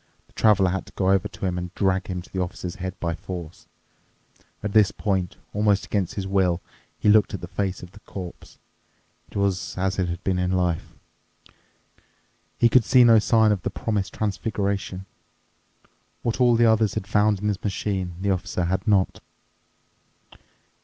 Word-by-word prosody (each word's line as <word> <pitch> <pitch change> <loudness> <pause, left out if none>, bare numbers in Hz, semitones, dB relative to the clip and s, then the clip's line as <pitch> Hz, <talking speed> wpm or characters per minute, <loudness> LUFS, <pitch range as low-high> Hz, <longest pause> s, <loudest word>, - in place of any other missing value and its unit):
The - - -30
Traveler 100 -4 +4
had 95 - -3
to - - -15
go 95 -1 +1
over 95 +1 +2
to 95 0 -7
him 90 -1 -1
and 90 0 -6
drag 95 -1 +1
him 90 -2 -4
to - - -19
the 95 - -2
Officer's 90 0 -5
head 95 0 -5
by 85 -1 -1
force. 85 -1 -8 1.0
At 105 -1 -3
this 105 -3 +6
point, 95 -5 -1 0.2
almost 105 -1 +2
against 95 -4 -2
his 100 - -3
will, 95 -3 +1 0.4
he - - -1
looked 105 -1 +5
at - - -7
the 90 - -6
face 95 0 -3
of 90 - -10
the 105 - -15
corpse. 90 -4 -9 0.7
It - - -7
was 100 -3 -1
as 95 0 -1
it 90 -2 0
had 85 +1 -5
been 95 -1 0
in 90 0 0
his 95 - +1
life. 90 -3 -1 1.6
He 120 - +5
could 125 +2 +5
discover 125 +2 +5
no 115 -1 +7
sign 110 0 +4
of 100 -3 0
the - - -2
promised 100 -5 -3
transfiguration. 100 -2 -2 1.2
What 120 +2 -1
all 120 -1 +5
the 120 +1 +4
others 110 -2 +3
had 110 -3 -3
found 105 0 +2
in 105 - -5
the 100 -2 -1
machine, 95 -3 -2
the 100 0 +1
Officer 90 -1 -2
had 95 +2 -2
not. 100 -3 +2
95 Hz, 180 wpm, -24 LUFS, 90-105 Hz, 1.6 s, no